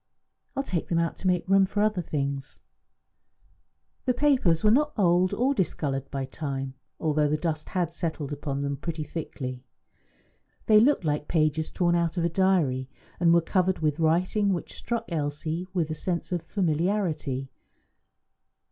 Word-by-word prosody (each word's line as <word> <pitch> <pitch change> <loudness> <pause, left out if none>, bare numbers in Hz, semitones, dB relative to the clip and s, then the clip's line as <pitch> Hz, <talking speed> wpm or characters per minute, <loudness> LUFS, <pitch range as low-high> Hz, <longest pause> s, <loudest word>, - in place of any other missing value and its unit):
I 275 - +1
will - - -7
take 180 - -2
them 170 - 0
out 170 0 0
to 190 - -3
make 180 -1 +1
room 195 0 +5
for 205 +1 0
other 210 -4 +1
things." 140 -3 -3 1.5
The 250 -2 +2
papers 250 - +3
were 210 - +5
not 295 +5 +3
old 180 -2 +3
nor 260 +4 +2
discoloured 140 - -1
by 135 -1 -3
time, 135 -1 -4 0.3
although 150 -1 +2
the 150 +1 +1
dust 155 -1 -3
had 175 -3 -1
settled 160 -4 -3
upon 140 -1 -3
them 140 0 -2
pretty 160 0 -4
thickly. 130 -5 -6 1.0
They 215 -1 +7
looked 245 - +3
like 150 -1 -1
pages 155 -1 +1
torn 175 -2 +1
out 170 0 0
of 170 - +1
a - - +2
diary, 165 -8 +1 0.3
and 170 -1 +4
were 170 0 +5
covered 185 +2 +1
with 155 0 0
writing 180 +6 +2
which 175 - -4
struck 235 -1 -3
Elsie 155 +2 -2
with 170 -4 -1
a - - 0
sense 170 +3 -3
of 175 -2 0
familiarity. 160 -7 -1
165 Hz, 165 wpm, -27 LUFS, 150-185 Hz, 1.5 s, They